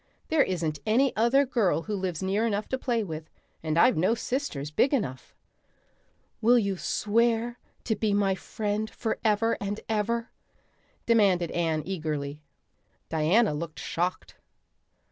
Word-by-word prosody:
There 315 -2 +4
isn't 165 - -1
any 245 +5 +2
other 240 +6 +4
girl 220 -10 +1
who 215 - -3
lives 185 -3 -3
near 200 +4 +1
enough 205 -1 -1
to 260 - -1
play 235 -4 0
with, 160 -4 -7 0.3
and 155 0 -1
I've 245 +5 +5
no 185 +8 +3
sisters 230 - -3
big 270 - +3
enough." 130 - -4 1.1
"Will 240 +3 +5
you 200 -4 +1
swear 230 +5 0 0.2
to 220 - 0
be 215 0 0
my 200 -1 +2
friend 210 +2 -3
forever 225 0 0
and 205 +1 -3
ever?" 225 +2 -1 0.7
demanded 195 -7 +3
Anne 160 -3 0
eagerly. 150 -5 -3 0.7
Diana 165 +6 +3
looked 155 +1 -5
shocked. 180 +2 -3
205 Hz, 135 wpm, -27 LUFS, 170-230 Hz, 1.1 s, I've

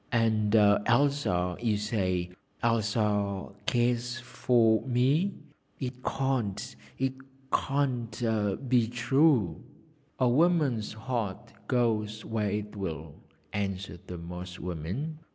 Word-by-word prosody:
And 110 -3 +2
Elsa, 105 -3 +3
you 110 -3 +2
say, 95 -4 -1 0.3
Elsa 105 -3 +1 0.2
cares 120 0 +1
for 120 -2 +2
me? 140 +10 +2 0.4
It 125 -1 -5
can't 120 - -1 0.2
it 130 0 0 0.4
can't 120 -4 0
be 120 -2 +4
true.' 120 - +2 0.6
'A 130 - +4
woman's 140 -6 +2
heart 110 -3 -4
goes 110 -3 0
where 110 -2 -1
it 105 +1 -3
will,' 80 -6 -5 0.4
answered 95 -2 -3
the 90 - -6
Moss 90 +1 -7
woman. 90 - -4
110 Hz, 100 wpm, -29 LUFS, 100-125 Hz, 0.6 s, be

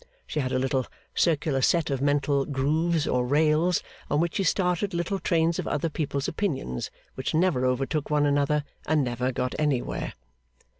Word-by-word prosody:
She 155 - -3
had 130 -3 -1
a - - +1
little 130 0 0 0.3
circular 155 -4 +1
set 165 +3 +2
of 135 -1 -1
mental 145 0 +2
grooves 155 +4 +1
or 125 0 +1
rails 155 +5 +3 0.3
on 145 - +2
which 170 0 0
she 195 - +1
started 180 +1 +1
little 175 +3 -1
trains 165 -2 +1
of - - -3
other 150 +3 0
people's 145 -3 -2
opinions, 130 - -2 0.2
which 130 +4 -3
never 160 -6 +2
overtook 135 +4 -1
one 150 -1 +3
another, 145 +1 +2 0.2
and 155 -2 +3
never 125 +1 -1
got 125 0 -2
anywhere. 145 -5 -1
150 Hz, 165 wpm, -26 LUFS, 135-165 Hz, 0.3 s, rails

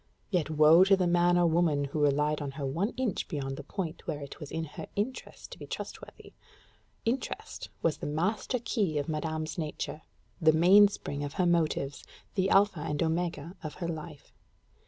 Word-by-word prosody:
Yet 175 -6 +1
woe 155 +2 +6
be 190 - +6
to 195 0 +6
the 185 - +1
man 175 0 +3
or 175 - +4
woman 160 -3 +2
who 140 +2 -4
relied 150 +1 +2
on 145 - -3
her 140 -1 -4
one 165 +10 0
inch 250 -7 -1
beyond 135 -3 -3
the - - -7
point 170 -4 -5
where 150 -3 -2
it 140 -1 -9
was 150 - -8
her 160 -2 -5
interest 225 +6 -4
to - - -10
be - - -8
trustworthy; - - -8 0.7
interest 240 +4 -3
was 155 -3 +2
the - - -5
master 185 - -1
key 205 - -1
of 145 - -1
madame's 155 +1 -3
nature 155 0 -4 0.4
the 155 -1 +6
mainspring 180 -3 +4
of 145 0 -5
her 185 - +1
motives 155 -5 0 0.3
the 190 -1 +1
alpha 200 -3 +4
and 150 0 -1
omega 165 0 -2
of 155 - -6
her 170 - -4
life. 155 -2 -7
160 Hz, 180 wpm, -29 LUFS, 150-180 Hz, 0.7 s, woe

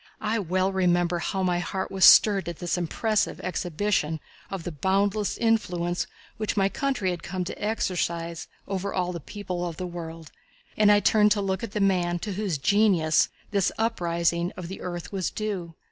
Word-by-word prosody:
I 220 +1 0
well 185 +1 0
remember 175 -2 +2
how 190 +2 -2
my 180 -1 +1
heart 190 +2 -3
was 190 -2 +4
stirred 200 -4 +7
at 170 - -6
this 175 -1 -1
impressive 205 +5 0
exhibition 175 -2 -1 0.3
of 195 -3 -5
the 175 - -4
boundless 195 +6 0
influence 180 -7 0 0.3
which 215 0 -2
my 195 0 +3
country 255 -7 -1
had 175 -1 -5
come 185 0 -3
to 180 - -6
exercise 170 -5 -2 0.2
over 195 0 -2
all 180 -1 0
the 170 - -5
people 180 +1 -5
of 170 -2 -4
the 185 - -4
world, 165 -2 -7 0.4
and 210 -1 +5
I 205 0 +5
turned 210 0 +4
to 205 - -2
look 190 +1 -1
at 220 -3 -5
the 210 - -1
man 180 -3 +2
to 205 +3 -4
whose 195 -5 -1
genius 180 -1 +3 0.2
this 200 -2 +2
uprising 170 -5 0
of 175 -2 -6
the 190 - -7
earth 175 -3 -5
was 190 -3 -1
due. 190 -6 -4
185 Hz, 180 wpm, -26 LUFS, 175-205 Hz, 0.4 s, stirred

